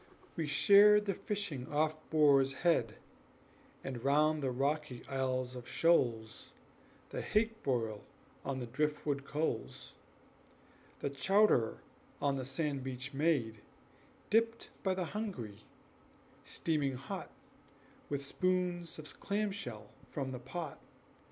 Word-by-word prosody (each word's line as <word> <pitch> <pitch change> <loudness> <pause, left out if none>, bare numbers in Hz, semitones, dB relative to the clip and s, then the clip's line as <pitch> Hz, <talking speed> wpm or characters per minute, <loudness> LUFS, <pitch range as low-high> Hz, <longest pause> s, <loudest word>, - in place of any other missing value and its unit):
We 160 -2 -2
shared 205 +7 +7
the 200 - +1
fishing 180 - -4
off 155 +1 +2
Boar's 140 -4 +5
Head, 115 -11 +3 0.9
And 125 -3 -5
round 150 +2 +3
the 135 - 0
rocky 140 0 -1
Isles 130 -2 -1
of 125 -1 -8
Shoals 115 -10 +1 0.6
The - - -3
hake 225 +1 +1
broil 115 -6 -1 0.4
on 135 -1 -2
the 125 - -3
drift 150 +5 -1
wood 140 -2 -1
coals; 150 +3 -3 1.1
The 140 - -1
chowder 165 - +3 0.4
on 140 -1 +1
the 130 -2 -3
sand 140 -1 -1
beach 130 +1 -5
made, 135 -8 +1 0.7
Dipped 230 +1 +2
by 190 -1 +1
the 185 -1 -1
hungry, 145 - -5 0.8
steaming 145 -5 -1
hot, 135 +2 -6 0.8
With 140 -1 -2
spoons 180 +1 0
of 155 -1 -8
clam 205 +1 0
shell 110 - -7 0.2
from 135 -3 -3
the 125 - -5
pot. 140 +4 -6
145 Hz, 120 wpm, -34 LUFS, 130-175 Hz, 1.1 s, shared